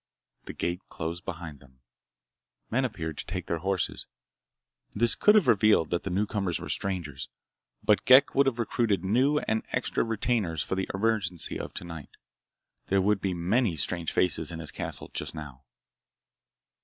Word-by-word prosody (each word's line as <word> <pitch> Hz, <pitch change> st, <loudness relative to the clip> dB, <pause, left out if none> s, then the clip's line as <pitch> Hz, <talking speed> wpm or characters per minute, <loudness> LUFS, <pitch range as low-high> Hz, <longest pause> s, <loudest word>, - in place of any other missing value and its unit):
The -, -, -7 dB
gate 85 Hz, +2 st, -2 dB
closed 85 Hz, +2 st, -5 dB
behind 85 Hz, -5 st, -6 dB
them. 65 Hz, -1 st, -21 dB, 0.9 s
Men 130 Hz, +3 st, +2 dB
appeared 80 Hz, -10 st, -4 dB
to -, -, -5 dB
take -, -, -4 dB
their 85 Hz, -, -2 dB
horses. 95 Hz, +1 st, -1 dB, 0.9 s
This 115 Hz, +2 st, +3 dB
could 210 Hz, -, +5 dB
have 210 Hz, -6 st, +5 dB
revealed 110 Hz, -7 st, +4 dB
that 85 Hz, -, +1 dB
the -, -, -4 dB
newcomers 95 Hz, -2 st, -1 dB
were -, -, -7 dB
strangers, 85 Hz, -8 st, -3 dB, 0.5 s
but 105 Hz, -, +3 dB
Ghek 130 Hz, +2 st, +7 dB
would 140 Hz, 0 st, +4 dB
have 125 Hz, -3 st, +1 dB
recruited 115 Hz, -5 st, 0 dB
new 130 Hz, +10 st, +3 dB
and 110 Hz, -6 st, 0 dB
extra -, -, 0 dB
retainers 110 Hz, -7 st, 0 dB
for -, -, -4 dB
the 95 Hz, 0 st, -2 dB
emergency 95 Hz, -5 st, -1 dB
of -, -, -7 dB
tonight. 80 Hz, -5 st, -8 dB, 0.7 s
There 100 Hz, -, +3 dB
would 100 Hz, +1 st, +2 dB
be 95 Hz, -2 st, -1 dB
many 95 Hz, +3 st, +1 dB
strange 85 Hz, +1 st, -2 dB
faces 85 Hz, -3 st, +1 dB
in 85 Hz, -, -5 dB
his 80 Hz, -2 st, -5 dB
castle -, -, -6 dB
just -, -, -3 dB
now. 70 Hz, -4 st, -9 dB
95 Hz, 160 wpm, -28 LUFS, 85-110 Hz, 0.9 s, Ghek